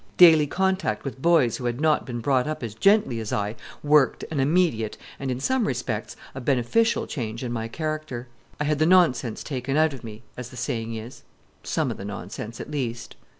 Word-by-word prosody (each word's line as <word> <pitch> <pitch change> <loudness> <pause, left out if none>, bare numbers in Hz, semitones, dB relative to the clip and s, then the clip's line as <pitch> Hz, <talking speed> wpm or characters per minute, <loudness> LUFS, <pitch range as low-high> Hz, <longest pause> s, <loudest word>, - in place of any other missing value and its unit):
Daily 160 -4 +8
contact 190 +4 0
with 135 -1 -6
boys 160 -8 +4
who 125 - -6
had 120 +1 -1
not 155 -1 +2
been 120 -2 -4
brought 130 +1 +2
up 155 -4 -4
as 115 -3 -4
gently 195 - +3
as 110 -2 -5
I 105 +2 -1 0.3
worked 145 -2 +3
an 150 - -1
immediate, 140 -7 +1 0.2
and, 135 - -3
in 125 -1 -2
some 255 - +1
respects, 120 -4 -3 0.2
a 130 - -6
beneficial 140 - +2
change 115 -3 -4
in 120 - -3
my 115 -1 -2
character. 155 -3 -4 0.3
I - - +1
had 150 0 0
the 155 - +4
nonsense 155 -11 +3
taken 135 0 -2
out 155 -1 +3
of 130 - -9
me, 110 0 -9
as 125 -1 -7
the 125 - -12
saying 115 -2 -3
is 115 +3 -8 0.4
some - - -1
of - - -6
the 100 - -7
nonsense, 100 +3 -6
at - - -7
least. 120 -5 -4
130 Hz, 200 wpm, -25 LUFS, 115-155 Hz, 0.4 s, Daily